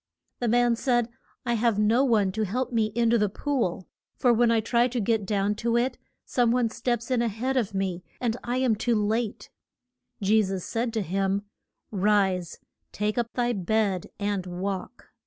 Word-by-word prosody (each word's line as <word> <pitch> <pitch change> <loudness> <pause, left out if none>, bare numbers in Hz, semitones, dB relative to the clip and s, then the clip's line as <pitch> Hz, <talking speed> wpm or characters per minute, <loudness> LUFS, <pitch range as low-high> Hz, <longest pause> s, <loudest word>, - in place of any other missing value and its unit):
The 240 - -1
man 240 +1 +3
said, 240 -1 +1 0.4
I 240 - +1
have 230 -2 +2
no 220 +5 +3
one 215 -7 +3
to 220 - -3
help 250 +6 -2
me 225 -2 +2
in 235 -1 +3
to 235 - +4
the 210 -1 +2
pool, 220 - -2 0.3
for 245 -2 +4
when 235 +1 +3
I 230 -1 +3
try 235 +2 +2
to 250 0 -2
get 220 -2 0
down 200 0 +1
to 235 0 +1
it, 250 +1 0 0.3
some 245 -2 +2
one 235 -1 +2
steps 240 +1 -2
in 250 -2 +2
a 235 - +1
head 240 +5 -2
of 220 -6 0
me 185 -2 -2 0.2
and 235 -3 0
I 245 +1 -1
am 255 -4 +2
too 230 +2 0
late. 215 +1 -1 0.7
Je 215 +1 +4
sus 190 -3 -3
said 230 +1 -1
to 220 -3 0
him, 195 +2 0 0.5
Rise, 195 -3 +1 0.3
take 210 +3 -1
up 235 -1 -2
thy 245 -1 +1
bed 200 -1 0
and 200 -2 -2
walk. 190 +5 -5
225 Hz, 190 wpm, -26 LUFS, 200-240 Hz, 0.7 s, to